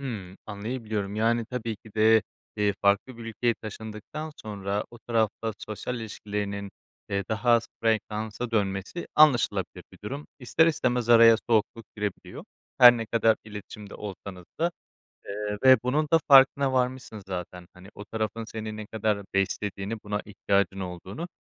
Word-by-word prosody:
Hımm. 100 -9 -6
Anlayabiliyorum, 105 -1 -4
yani, 115 +1 +2
tabii 115 -3 -4
ki 105 0 -18
de, 110 0 +5 0.3
eee, 105 -1 +1
farklı 100 +5 +2
bir 115 - -8
ülkeye 115 +1 0
taşındıktan 110 +8 -7
sonra 100 -1 -3
o 120 - -13
tarafla 115 -1 -1
sosyal 110 +4 -5
ilişkilerinin, 100 -2 -4 0.4
eee, 100 -1 -1
daha 110 +2 0
az 115 -1 +4 0.2
frekansa 110 +1 -1
dönmesi 100 - -2
anlaşılabilir 150 -6 +3
bir - - -15
durum. 140 +7 -5
İster 150 +5 +3
istemez 125 -6 0
araya 115 -1 +8
soğukluk 110 0 +1
girebiliyor, 105 -2 -5 0.3
her 120 -1 +10
ne 115 -1 -4
kadar 115 -1 +3
iletişimde 105 0 -9
olsanız 95 -2 -8 0.2
da. 170 - +2 0.6
Eee, 105 +1 -4
ve 130 0 +9
bunun 150 +4 +1
da 165 - +7
farkına 135 0 +6
varmışsın 125 -4 -1
zaten, 90 -1 -6
hani, 90 +1 -14
o 105 - -9
tarafın 110 +1 -3
seni 110 -1 -6
ne 110 -1 -7
kadar 105 -2 -1
beslediğini, 100 +2 -1
buna 105 0 -2
ihtiyacın 100 -1 0
olduğunu. 95 - -6
110 Hz, 145 wpm, -27 LUFS, 100-120 Hz, 0.6 s, her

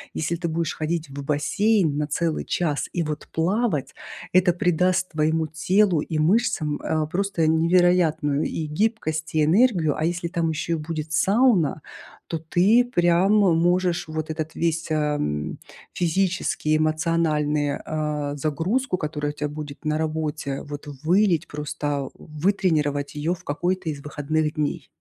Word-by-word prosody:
если 165 +2 -1
ты 170 0 -3
будешь 165 -1 -1
ходить 160 0 -2
в 140 +1 -7
бассейн 155 +4 +1
на 150 0 -1
целый 160 +2 -1
час 155 -5 -1
и 175 - 0
вот 150 -1 -5
плавать, 180 - 0 0.4
это 180 -1 +5
придаст 180 0 +1
твоему 160 +1 +1 0.2
телу 190 -3 +4
и 155 +1 -3
мышцам, 165 -3 +1
а, 155 -1 0
просто 180 0 0
невероятную 160 -2 +3
и 155 - -4
гибкость, 160 -3 -1
и 155 - +4
энергию. 175 - +3
А 155 - 0
если 170 0 -2
там 165 -1 0
ещё 160 +2 -2
и - - +2
будет 155 0 -5
сауна, 190 - +3 0.5
то 165 - -3
ты 190 +9 +3
прям 175 -3 +3
можешь 175 -2 +2
вот 155 0 -4
этот 155 0 -4
весь, 165 0 -1
ам, 75 - -1 0.4
физический, 175 -3 0
эмоциональный, 155 -2 +1
э, 150 -2 -2
загрузку, 180 - -1
которая 150 -2 -3
у - - -27
тебя 150 0 -3
будет 145 -1 -8
на 155 0 +1
работе, 155 -3 -2
вот 145 0 -8 0.2
вылить, 175 -1 +3
просто 145 -2 -3
вытренировать 150 -4 -1
ее 155 +4 0
в - - -18
какой-то 175 +4 -2
из 145 -2 -5
выходных 150 +1 -1
дней. 150 0 -2
160 Hz, 145 wpm, -24 LUFS, 150-175 Hz, 0.5 s, это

